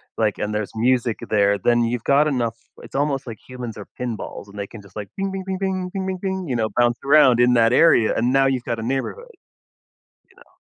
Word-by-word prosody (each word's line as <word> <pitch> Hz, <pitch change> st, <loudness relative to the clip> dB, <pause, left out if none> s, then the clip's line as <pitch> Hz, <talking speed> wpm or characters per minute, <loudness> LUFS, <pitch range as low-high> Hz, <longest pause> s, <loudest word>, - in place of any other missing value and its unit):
like, 110 Hz, -2 st, 0 dB
and 105 Hz, 0 st, -3 dB
there's 105 Hz, -1 st, -3 dB
music 120 Hz, 0 st, +1 dB
there, 100 Hz, -1 st, +3 dB
then 120 Hz, +2 st, +2 dB
you've 115 Hz, 0 st, -2 dB
got 145 Hz, +2 st, +3 dB
enough 120 Hz, -5 st, -1 dB, 0.3 s
it's -, -, -13 dB
almost 140 Hz, -1 st, 0 dB
like 110 Hz, -3 st, -7 dB
humans 125 Hz, -4 st, -7 dB
are 105 Hz, -, -9 dB
pinballs, 115 Hz, -4 st, -5 dB
and 100 Hz, +1 st, -13 dB
they 100 Hz, -, -4 dB
can 110 Hz, -, -11 dB
just, 100 Hz, -, -19 dB
"Ping 105 Hz, -2 st, -5 dB, 0.2 s
ping 190 Hz, -1 st, -5 dB
ping 190 Hz, 0 st, -3 dB
ping, 185 Hz, -1 st, -2 dB
ping 190 Hz, -1 st, -3 dB
ping 185 Hz, -1 st, -3 dB
ping." 190 Hz, -2 st, -3 dB
you 125 Hz, -, -2 dB
know, 110 Hz, -2 st, 0 dB
bounce 120 Hz, 0 st, +3 dB
around 135 Hz, -4 st, +5 dB
in 125 Hz, 0 st, +5 dB
that 115 Hz, 0 st, +4 dB
area, 120 Hz, -7 st, +5 dB
and 120 Hz, +3 st, +1 dB
now 135 Hz, 0 st, +4 dB
you've 130 Hz, -2 st, 0 dB
got 115 Hz, -1 st, -3 dB
a -, -, -5 dB
neighborhood, 135 Hz, -, -3 dB
you -, -, -32 dB, 1.0 s
know. -, -, -30 dB
120 Hz, 230 wpm, -22 LUFS, 110-140 Hz, 1.0 s, around